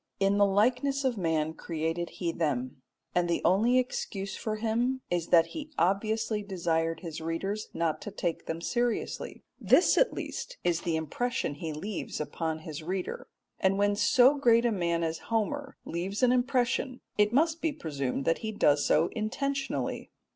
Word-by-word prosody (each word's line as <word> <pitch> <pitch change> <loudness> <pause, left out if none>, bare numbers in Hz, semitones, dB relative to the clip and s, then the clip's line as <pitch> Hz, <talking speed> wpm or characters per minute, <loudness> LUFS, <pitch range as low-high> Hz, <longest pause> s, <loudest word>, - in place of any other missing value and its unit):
In 195 +1 +3
the 200 - +6
likeness 250 +8 +2
of 260 -2 +1
man 160 -4 0
created 165 +1 -3
he 170 -2 -1
them, 135 -5 -2 0.3
and 175 -1 +1
the 170 - +1
only 215 +8 +4
excuse 200 -6 -2
for 215 -1 -3
him 235 +4 0
is 175 -2 0
that 165 -2 +6
he 310 -1 -6
obviously 215 +4 +1
desired 165 -4 -1
his 165 -3 -6
readers 195 +6 -3
not 165 -2 -1
to - - -5
take 180 -4 -3
them 165 +1 -3
seriously. 240 +4 -2 0.2
This - - +5
at - - +4
least - - -6
is 170 -1 +1
the 170 -2 -1
impression 160 +5 -2
he 155 +2 -5
leaves 190 +7 -5
upon 160 +1 -3
his 155 -1 -7
reader, 185 +3 -4 0.3
and 190 0 +2
when 205 0 +2
so 260 +6 +5
great 235 -3 +5
a 235 - +3
man 170 -4 0
as 160 0 -2
Homer 270 +6 -1
leaves 190 +7 -3
an 250 - +6
impression 255 0 +1 0.2
it 210 0 +4
must 320 +5 +2
be 320 - +1
presumed 140 - -3
that 165 - +2
he 220 - -3
does 145 -8 +3
so 160 +2 +3
intentionally. 275 +5 -2
195 Hz, 170 wpm, -29 LUFS, 165-240 Hz, 0.3 s, the